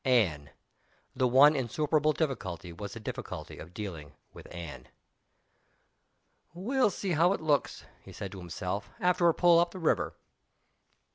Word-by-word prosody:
Anne! 95 - +2 0.7
The 130 - +2
one 140 +5 +7
insuperable 150 +4 +1
difficulty 95 - -3
was 100 +3 -7
the 115 - -7
difficulty 110 - -7
of 85 - -10
dealing 90 -7 -7 0.2
with - - -12
Anne. 75 -7 -8 1.7
"We'll 245 +6 +2
see 195 0 -3
how 170 +3 +4
it - - -3
looks," 150 -3 0 0.2
he - - -13
said 100 - -6
to 95 - -8
himself, 90 +3 -4
"after 180 -3 +3
a - - +3
pull 175 -1 +6
up 170 0 +2
the 185 - -10
river!" 165 -3 0
130 Hz, 145 wpm, -30 LUFS, -, 1.7 s, one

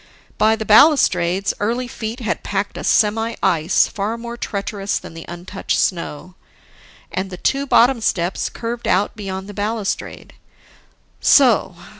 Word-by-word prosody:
By 220 +1 +4
the 220 -1 -5
balustrades, 195 - +4
early 235 +4 -1
feet 230 +1 -6
had 220 - -2
packed 200 0 -3
a - - -6
semi 225 +2 +2
ice 160 +2 +3
far 210 +3 -3
more 235 0 -7
treacherous 200 -3 -3
than - - -9
the 165 0 -9
untouched 175 +3 -4
snow; 170 -1 -2 0.8
and, 190 +1 -3
the 180 - -8
two 275 +8 0
bottom 245 -1 +4
steps 175 -4 -1
curved 235 +1 -5
out 190 +3 +1
beyond 190 -2 -6
the 205 - -9
balustrade. 205 +1 -4 0.9
So 235 -9 +4
205 Hz, 140 wpm, -19 LUFS, 190-230 Hz, 0.9 s, By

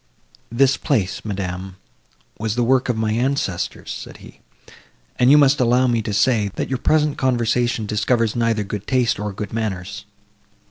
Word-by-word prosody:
"This 130 +2 +3
place, 110 - -1
madam, 95 -2 -5 0.6
was 110 0 -2
the 120 - +1
work 130 +2 +2
of 120 - 0
my 110 -1 0
ancestors," 120 -7 -2
said - - -8
he, - - -15 0.8
"and 125 0 +4
you 145 - +7
must 145 0 +4
allow 125 +1 +3
me 120 -2 +1
to 110 - -4
say, 105 -1 +2
that - - -3
your 130 -2 -2
present 150 +1 +1
conversation 120 -2 0
discovers 110 +2 0
neither 115 -3 +1
good 105 0 -6
taste, 125 -6 +1
nor 105 0 -3
good 100 +1 -7
manners." 100 -2 -4
115 Hz, 165 wpm, -21 LUFS, 105-130 Hz, 0.8 s, you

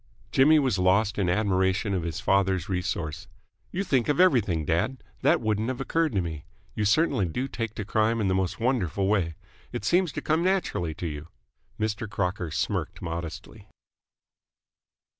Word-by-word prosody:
Jimmy 150 +4 +6
was 130 -10 +1
lost 100 +3 +2
in 95 -3 +1
admiration 95 +1 +1
of 95 - 0
his 85 0 -4
father's 95 -2 +1
resource. 90 -4 -3 0.4
"You 190 - -2
think 130 - +1
of 145 - +1
everything, 110 - +3
dad! 85 - -1 0.2
That - - +3
wouldn't 110 0 0
have 130 -1 -3
occurred 160 +2 0
to 95 - +2
me. 80 -4 -5 0.3
You 105 - -1
certainly 110 - +2
do 125 +11 -2
take 115 -4 -4
to 110 - -4
Crime 110 +3 +1
in 105 - +1
the 95 - +2
most 95 -1 -1
wonderful 105 - 0
way. 95 -5 +1 0.4
It - - -5
seems 175 - +3
to - - -3
come 160 +2 +1
naturally 175 - 0
to 90 - -5
you!" 75 -1 -5 0.5
Mr. 110 0 -2
Crocker 90 -4 -2
smirked - - -2
modestly. 85 -1 -6
100 Hz, 165 wpm, -27 LUFS, 90-125 Hz, 0.5 s, Jimmy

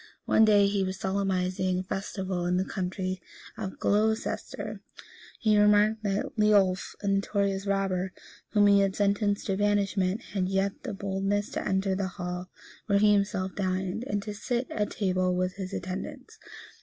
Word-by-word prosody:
One 220 - +5
day, 205 -2 +5
as 200 - +1
he 200 -1 +1
was 185 0 -3
solemnizing 185 -1 0
a 185 - -2
festival 190 -2 -3
in 180 0 +2
the 190 - +1
county 185 -1 -3 0.3
of 195 -4 -5
Glocester, 220 +2 -1 0.6
he 215 -2 +3
remarked 210 +1 +4
that 200 -1 -2
Leolf, 200 -3 +3
a - - -2
notorious 195 0 0
robber, 190 -2 0 0.4
whom 205 -1 +4
he 200 0 +6
had 195 -1 +1
sentenced 205 0 +1
to 195 -2 0
banishment, 205 0 +1
had 185 -2 0
yet 195 +1 +1
the 240 -6 -5
boldness 195 +1 -1
to - - -3
enter 190 0 +1
the 190 0 -1
hall 180 0 -4 0.4
where 200 -2 +3
he 210 +1 +5
himself 200 -2 0
dined, 190 +2 -2
and 205 -1 -1
to 210 - -5
sit 240 +4 -2
at 210 -1 -1
table 185 -2 0
with 185 +1 -1
his 190 -1 -5
attendants. 185 0 -6
195 Hz, 165 wpm, -28 LUFS, 185-205 Hz, 0.6 s, he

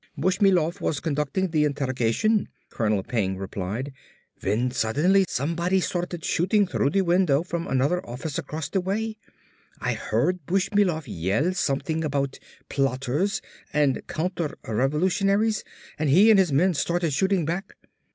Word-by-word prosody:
"Bushmilov 180 0 +2
was 145 - -1
conducting 160 +4 -1
the 155 -2 +2
interrogation," 140 - +1 0.2
Colonel 105 -4 0
Peng 95 -5 -1
replied, 100 +8 -4 0.5
"when 115 +6 0
suddenly 150 - +2
somebody 170 +7 0
started 175 -2 -3
shooting 200 +4 +2
through 180 -6 0
the 195 +4 +2
window 170 -4 +3
from 170 -1 -4
another 140 +7 +1
office 130 +5 -5
across 155 -1 -5
the 190 +4 -1
way. 215 +4 -2 0.6
I - - -1
heard 170 +12 -1
Bushmilov 190 -3 +1
yell 100 - 0
something 160 0 -1
about 140 -2 -2 0.3
plotters 135 +8 0 0.3
and 145 -3 +2
counterrevolutionaries 180 - 0 0.4
and 155 -2 +1
he 195 +10 +7
and 210 - +6
his 180 -5 +3
men 175 +7 +3
started 170 0 0
shooting 190 +2 +1
back. 175 +5 -4
160 Hz, 130 wpm, -25 LUFS, 135-185 Hz, 0.6 s, he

